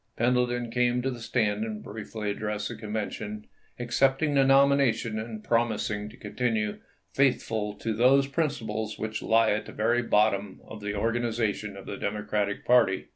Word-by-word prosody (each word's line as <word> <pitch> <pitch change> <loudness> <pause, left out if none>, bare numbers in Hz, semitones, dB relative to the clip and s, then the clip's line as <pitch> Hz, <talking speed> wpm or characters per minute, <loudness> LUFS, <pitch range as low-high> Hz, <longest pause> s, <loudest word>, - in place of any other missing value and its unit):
Pendleton 120 0 +1
came 125 0 +1
to 135 - 0
the 125 - -7
stand 110 -3 0
and 110 -1 -5
briefly 105 0 -5
addressed 105 0 -3
the 120 - -6
Convention, 105 -1 -5 0.3
accepting 135 +5 +1
the 135 -1 +5
nomination 135 -5 +3
and 110 -1 -6
promising 110 -3 0
to 115 - -15
continue 110 -4 -2 0.2
" - - -42
faithful 110 -6 +1
to 110 +2 -3
those 130 +5 +4
principles 115 -8 -2
which 110 0 -4
lie 115 0 +3
at 105 +1 -1
the - - -8
very 115 +3 +1
bottom 105 -3 +1
of 110 - -10
the 105 0 -3
organization 115 -2 -1
of 95 - -10
the 100 - -6
Democratic 105 0 -2
party." 120 -6 +3
110 Hz, 160 wpm, -27 LUFS, 105-120 Hz, 0.3 s, the